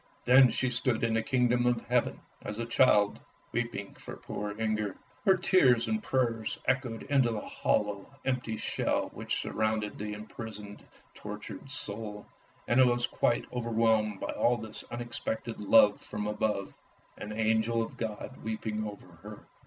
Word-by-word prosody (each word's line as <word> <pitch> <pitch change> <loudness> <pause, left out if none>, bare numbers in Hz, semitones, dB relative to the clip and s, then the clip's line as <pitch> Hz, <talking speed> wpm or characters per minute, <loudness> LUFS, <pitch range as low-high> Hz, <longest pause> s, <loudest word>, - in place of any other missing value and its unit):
Then 130 +1 +8
she 125 +2 0
stood 125 -2 0
in 115 -1 +2
the 115 - +2
Kingdom 125 0 +2
of 120 -1 +2
Heaven, 125 -1 0 0.2
as 105 - -5
a 115 - -2
child, 105 -4 +4 0.3
weeping 120 -4 -3
for - - -9
poor 105 +1 -5
Inger. 105 -3 -1 0.3
Her 190 -1 +6
tears 130 -10 +4
and 220 0 0
prayers 120 - 0
echoed 125 -4 0
into 135 -4 +3
the 110 -2 -2
hollow, 105 -2 -1 0.2
empty 125 -4 -1
shell - - -1
which - - -2
surrounded 110 -1 -1
the 105 0 -4
imprisoned, 105 -1 -8 0.3
tortured - - -8
soul, 105 -6 -4 0.4
and 120 - +3
it 130 - +8
was 120 0 +2
quite 120 - +1
over 120 -1 -3
whelmed 110 -3 +2
by 100 - -4
all 120 0 +2
this 110 -1 -7
unexpected 120 -1 -4
love 105 0 +5
from 105 0 -5
above. 105 -2 -1 0.5
An 105 - -6
angel 110 +1 +1
of 115 - -8
God 110 +3 -5
weeping 110 -1 -3
over 105 -1 -9 0.2
her 105 +1 -10
115 Hz, 155 wpm, -30 LUFS, 105-120 Hz, 0.5 s, Then